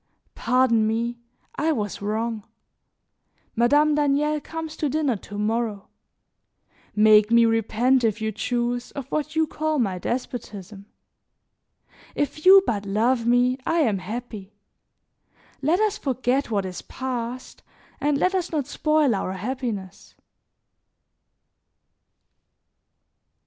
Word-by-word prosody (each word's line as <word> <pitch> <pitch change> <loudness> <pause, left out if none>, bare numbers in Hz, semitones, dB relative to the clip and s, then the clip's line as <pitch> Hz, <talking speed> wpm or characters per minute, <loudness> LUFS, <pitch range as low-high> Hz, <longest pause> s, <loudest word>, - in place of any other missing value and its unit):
Pardon 235 -2 +2
me, 235 +2 -2 0.4
I 320 +2 +1
was 210 -10 -3
wrong. 220 +2 -2 1.1
Madame 290 +6 +4
Daniel 295 +1 +1
comes 320 0 -6
to 300 - -1
dinner 285 -3 0
to 205 +1 -10
morrow; 215 -1 -2 1.1
make 215 0 +6
me 235 0 +5
repent, 230 +3 +2
if 225 -1 +1
you 220 0 -2
choose, 240 +3 -2
of 280 -3 -6
what 305 +1 -2
you 320 0 +3
call 310 0 -2
my 195 -8 0
despotism. 210 -4 -5 1.3
If 305 +3 -2
you 385 0 +9
but 205 -3 -1
love 230 +4 +1
me 245 +2 +3
I 330 +5 +1
am 215 -9 +1
happy; 215 0 -7 1.1
let 315 +7 +2
us 425 -1 0
forget 260 - -1
what 200 -3 -1
is 185 -1 -6
past 255 -1 -6 0.4
and 290 -1 +1
let 365 +6 +1
us 365 -2 -1
not 300 -5 -1
spoil 305 -2 +1
our 190 -2 -2
happiness." 205 -2 -5
245 Hz, 115 wpm, -24 LUFS, 215-290 Hz, 1.3 s, you